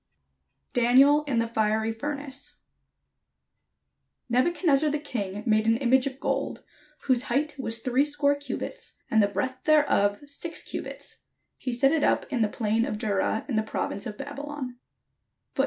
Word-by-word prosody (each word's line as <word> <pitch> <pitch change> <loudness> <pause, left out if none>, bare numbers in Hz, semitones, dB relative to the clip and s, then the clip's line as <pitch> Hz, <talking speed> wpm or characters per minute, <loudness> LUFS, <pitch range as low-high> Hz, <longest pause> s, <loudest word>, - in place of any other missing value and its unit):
] 65 0 -49
DANIEL 265 +5 +5
IN 275 -5 -1
THE 230 - +2
FIERY 220 -1 0
FURNACE 280 +3 -5 1.7
Nebuchadnezzar 300 +3 +3
the 295 - 0
king 210 -9 -4
made 215 -1 +2
an 225 0 +4
image 260 +1 +3
of 265 0 -6
gold, - - -2 0.4
whose 255 -3 +2
height 290 +5 0
was 230 -3 -2
threescore 285 +3 +2
cubits/ 285 +11 -6
and 220 - +5
the 200 - +4
breadth 255 +5 -3
thereof 290 -9 +3
six 305 +4 -6
cubits: - - -7 0.3
he 255 - -3
set 260 +3 +3
it 315 -2 +1
up - - +2
in 245 - +1
the 215 - +2
plain 225 +1 0
of 215 - -2
Dura, 215 0 0
in 250 -6 -1
the - - +4
province 210 -2 -3
of 210 -1 -7
Babylon. 285 -2 -6
255 Hz, 150 wpm, -27 LUFS, 220-285 Hz, 1.7 s, DANIEL